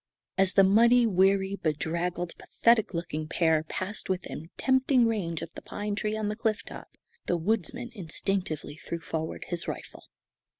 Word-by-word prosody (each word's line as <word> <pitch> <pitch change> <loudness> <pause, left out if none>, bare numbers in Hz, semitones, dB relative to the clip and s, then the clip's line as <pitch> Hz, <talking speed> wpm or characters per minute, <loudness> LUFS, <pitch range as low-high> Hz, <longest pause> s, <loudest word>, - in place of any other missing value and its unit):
As 195 -1 +3
the 195 - +7
muddy, 235 +5 +6
weary, 195 -1 +3
bedraggled, 170 +2 -2
pathetic 230 -5 +2
looking 155 -2 -3
pair 160 -1 +2
passed 185 +6 -4
within 180 -3 -4
tempting 260 -1 +3
range 175 -8 -1
of 165 - -8
the - - -9
pine 205 0 -4
tree 215 +1 -1
on 215 -1 -1
the 210 - -2
cliff 220 -1 -1
top, - - -11 0.3
the 175 - +2
woodsman 225 +6 -1
instinctively 180 -5 -2
threw 170 - -5
forward 160 0 -4
his 175 -1 -3
rifle. - - -7
190 Hz, 155 wpm, -28 LUFS, 165-215 Hz, 0.3 s, the